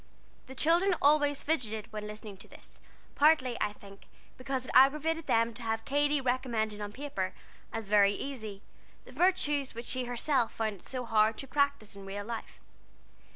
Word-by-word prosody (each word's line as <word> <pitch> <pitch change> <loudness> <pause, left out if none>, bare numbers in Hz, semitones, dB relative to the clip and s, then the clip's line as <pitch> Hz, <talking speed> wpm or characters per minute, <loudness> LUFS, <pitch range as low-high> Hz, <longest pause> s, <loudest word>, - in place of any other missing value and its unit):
The 265 - -10
children 345 +6 +3
always 290 -1 +3
fidgeted 225 -8 -2
when 210 0 -5
listening 210 -1 -8
to 195 - -12
this, - - -15 0.3
partly, 290 -5 +4
I 205 - 0
think, 200 -1 -15 0.3
because 255 0 -3
it - - -6
aggravated 305 +5 +4
them 230 0 +2
to 245 - -9
have 225 -1 -2
Katy 290 +1 +2
recommending 235 -5 -1
on 205 0 -5
paper, 235 -7 -4 0.4
as 225 -2 -4
very 205 -1 +5
easy, 215 -6 -6 0.4
the - - -13
virtues 295 -8 +1
which 235 +1 -6
she 255 0 -1
herself 245 +1 0
found 220 -2 -2
it - - -18
so 255 -2 -4
hard 220 -1 +3
to 270 - -6
practise 280 -7 0
in 195 0 -10
real 200 +1 -5
life. 230 0 -7
245 Hz, 170 wpm, -30 LUFS, 215-285 Hz, 0.4 s, very